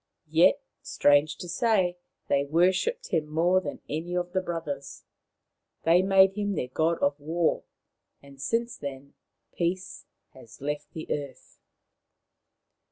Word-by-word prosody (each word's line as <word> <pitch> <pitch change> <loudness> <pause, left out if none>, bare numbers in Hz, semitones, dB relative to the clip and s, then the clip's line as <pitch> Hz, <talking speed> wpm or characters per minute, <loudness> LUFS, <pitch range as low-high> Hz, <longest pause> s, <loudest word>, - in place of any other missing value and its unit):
Yet, 180 - +5 0.2
strange 145 +1 +3
to 180 - -7
say, 185 -1 +1 0.3
they 140 0 +2
worshipped 185 - +1
him 155 -2 0
more 170 +4 +2
than 145 -6 -6
any 165 +4 -3
of 175 0 -2
the 185 - +1
brothers. 150 -6 -5 0.8
They 170 +2 +5
made 190 0 +5
him 205 -1 -2
their 125 -5 -3
god 160 +5 +1
of 140 +1 +1
war; 160 +3 0 0.5
and 140 -1 -15
since 235 +7 -1
then 140 0 -8 0.4
peace 180 +2 -3 0.3
has 120 -4 -15
left 145 +1 -4
the 160 - -6
earth. 140 -3 -6
165 Hz, 130 wpm, -27 LUFS, 145-185 Hz, 0.8 s, Yet